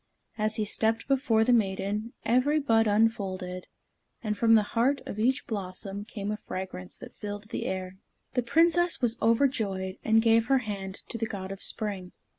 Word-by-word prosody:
As 215 Hz, 0 st, 0 dB
he 215 Hz, -, 0 dB
stepped 220 Hz, +2 st, 0 dB
before 255 Hz, -5 st, +3 dB
the 245 Hz, +2 st, +3 dB
maiden, 210 Hz, +1 st, 0 dB
every 255 Hz, +6 st, +3 dB
bud 225 Hz, -5 st, +3 dB
unfolded, 195 Hz, -4 st, 0 dB, 0.6 s
and 210 Hz, -2 st, -1 dB
from 225 Hz, +1 st, +5 dB
the 215 Hz, -, +5 dB
heart 260 Hz, +5 st, +2 dB
of 210 Hz, -, -6 dB
each 255 Hz, +5 st, +1 dB
blossom 195 Hz, -1 st, -5 dB
came 205 Hz, -2 st, -5 dB
a 210 Hz, -, -2 dB
fragrance 185 Hz, -, -6 dB
that -, -, -11 dB
filled 205 Hz, 0 st, -7 dB
the -, -, -3 dB
air. 185 Hz, 0 st, -4 dB, 0.4 s
The 250 Hz, -, +2 dB
Princess 340 Hz, +7 st, +3 dB
was 240 Hz, -2 st, +1 dB
overjoyed, 220 Hz, -6 st, +1 dB
and 220 Hz, 0 st, +4 dB
gave 225 Hz, 0 st, +4 dB
her 270 Hz, -, +4 dB
hand 195 Hz, -2 st, -4 dB
to 230 Hz, -, -3 dB
the 225 Hz, -, -1 dB
God 195 Hz, -3 st, -6 dB
of 195 Hz, -, -7 dB
Spring. 200 Hz, -5 st, -3 dB
215 Hz, 175 wpm, -28 LUFS, 195-230 Hz, 0.6 s, from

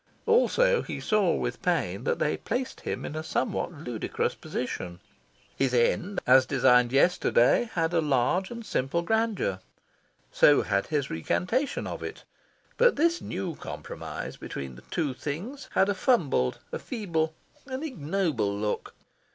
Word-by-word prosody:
Also, -, -, +4 dB
he -, -, -5 dB
saw 210 Hz, -5 st, +2 dB
with -, -, -3 dB
pain -, -, 0 dB
that 485 Hz, 0 st, +1 dB
they -, -, +1 dB
placed 255 Hz, +1 st, -3 dB
him -, -, -4 dB
in 150 Hz, -, -5 dB
a 155 Hz, -, -2 dB
somewhat 160 Hz, -1 st, -1 dB
ludicrous 135 Hz, -8 st, -3 dB
position. 90 Hz, -1 st, -5 dB, 0.6 s
His 130 Hz, -2 st, +1 dB
end, 175 Hz, +11 st, +1 dB
as 130 Hz, 0 st, +6 dB
designed 125 Hz, -2 st, +4 dB
yesterday, 175 Hz, -, +3 dB
had 165 Hz, 0 st, +1 dB
a 165 Hz, -, +3 dB
large 150 Hz, +6 st, +1 dB
and 235 Hz, -1 st, -7 dB
simple 155 Hz, +3 st, -1 dB
grandeur. 220 Hz, -, 0 dB, 0.7 s
So 145 Hz, -, +5 dB
had 100 Hz, -, 0 dB
his 145 Hz, -3 st, -1 dB
recantation 185 Hz, -, -1 dB
of -, -, -5 dB
it. -, -, -7 dB, 0.5 s
But -, -, +5 dB
this 335 Hz, +3 st, +2 dB
new 180 Hz, -1 st, -4 dB
compromise -, -, -7 dB
between 70 Hz, -2 st, -6 dB
the 60 Hz, -, -13 dB
two 155 Hz, -6 st, -1 dB
things 185 Hz, -, -6 dB
had 190 Hz, -, +4 dB
a 205 Hz, -, +2 dB
fumbled, 175 Hz, -, +2 dB
a -, -, -3 dB
feeble, 165 Hz, -9 st, -2 dB, 0.3 s
an 260 Hz, +2 st, -4 dB
ignoble 160 Hz, -, -1 dB
look. 105 Hz, 0 st, -3 dB
165 Hz, 145 wpm, -27 LUFS, -, 0.7 s, as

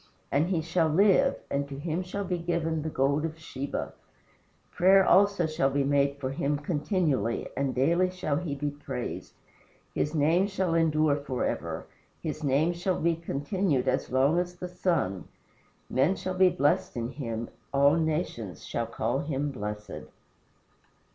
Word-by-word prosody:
And 145 Hz, +4 st, +2 dB
he 175 Hz, -4 st, 0 dB
shall 165 Hz, 0 st, +1 dB
live, 200 Hz, -, +4 dB, 0.2 s
and 140 Hz, 0 st, -1 dB
to 135 Hz, -, -6 dB
him 160 Hz, +4 st, -2 dB
shall 185 Hz, +2 st, -4 dB
be 180 Hz, -2 st, -2 dB
given 165 Hz, -2 st, -1 dB
the 160 Hz, -, -3 dB
gold 140 Hz, +1 st, +1 dB
of 160 Hz, 0 st, -3 dB
Sheba. 140 Hz, -3 st, -5 dB, 0.8 s
Prayer 190 Hz, +2 st, +5 dB
also 200 Hz, -2 st, +4 dB
shall 155 Hz, -3 st, +1 dB
be 140 Hz, +1 st, +1 dB
made 140 Hz, 0 st, +2 dB
for 130 Hz, -2 st, -3 dB
him 145 Hz, 0 st, 0 dB
continually, 150 Hz, -, 0 dB
and 135 Hz, -1 st, -1 dB
daily 170 Hz, +8 st, +3 dB
shall 180 Hz, -6 st, -2 dB
he 155 Hz, -4 st, -3 dB
be 145 Hz, +1 st, -2 dB
praised. 135 Hz, -4 st, -6 dB, 0.6 s
His 150 Hz, +2 st, -1 dB
name 165 Hz, +6 st, +3 dB
shall 190 Hz, -4 st, -1 dB
endure 155 Hz, -3 st, +3 dB
forever. 140 Hz, -3 st, -3 dB, 0.3 s
His 155 Hz, 0 st, -5 dB
name 145 Hz, +5 st, +2 dB
shall 180 Hz, +2 st, -1 dB
be 170 Hz, 0 st, +2 dB
continued 160 Hz, -2 st, -1 dB
as 130 Hz, +1 st, 0 dB
long 135 Hz, +6 st, +3 dB
as 180 Hz, 0 st, -3 dB
the 180 Hz, 0 st, -6 dB
sun. 165 Hz, -, -1 dB, 0.6 s
Men 140 Hz, +9 st, +2 dB
shall 185 Hz, -, -4 dB
be 185 Hz, 0 st, +5 dB
blessed 145 Hz, -5 st, +1 dB
in 115 Hz, 0 st, -2 dB
him. 115 Hz, -5 st, -4 dB, 0.2 s
All 140 Hz, +1 st, +5 dB
nations 155 Hz, -, -2 dB
shall -, -, -2 dB
call -, -, -1 dB
him 145 Hz, -1 st, -2 dB
blessed." 105 Hz, -, -6 dB
155 Hz, 155 wpm, -28 LUFS, 140-175 Hz, 0.8 s, Prayer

